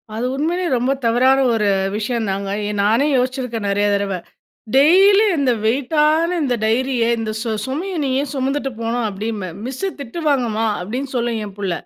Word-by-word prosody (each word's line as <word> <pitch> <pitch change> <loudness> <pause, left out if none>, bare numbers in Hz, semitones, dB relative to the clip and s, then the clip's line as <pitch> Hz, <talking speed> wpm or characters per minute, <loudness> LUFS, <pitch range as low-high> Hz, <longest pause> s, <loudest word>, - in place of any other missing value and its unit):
அது 230 +3 -2
உண்மையிலேயே 340 +5 -1
ரொம்ப 250 +3 0
தவறான 255 +4 +4
ஒரு 215 -2 +1 0.3
விஷயந்தாங்க. 210 -3 -2 0.2
ஏன் 210 -1 -3
நானே 225 +8 +3
யோசிச்சிருக்கேன் 250 -4 -2
நெறைய 205 +1 +1
தடவ. 200 -1 -1 0.6
டெய்லி 385 +9 +6
இந்த 275 -3 +2
வெய்ட் 250 +6 0
ஆன 330 +3 +2
இந்த 255 -3 +1
டைரிய, 240 +2 +1 0.2
இந்த 220 -1 -3
சு 230 -1 -2
சுமைய 325 +9 -4
நீ 275 - -1
ஏன் 285 -2 -5
சுமந்துட்டு 270 0 -1
போணும் 230 +1 -1
அப்படின்பேன். 205 -3 -5
"மிஸ்ஸு 270 +10 -3
திட்டுவாங்கம்மா" 255 -5 -1 0.2
அப்படின்னு 250 +9 -4
சொல்லும் 235 -2 -1
என் 200 -2 -10
புள்ள. 195 -3 -2
245 Hz, 155 wpm, -19 LUFS, 220-280 Hz, 0.6 s, டெய்லி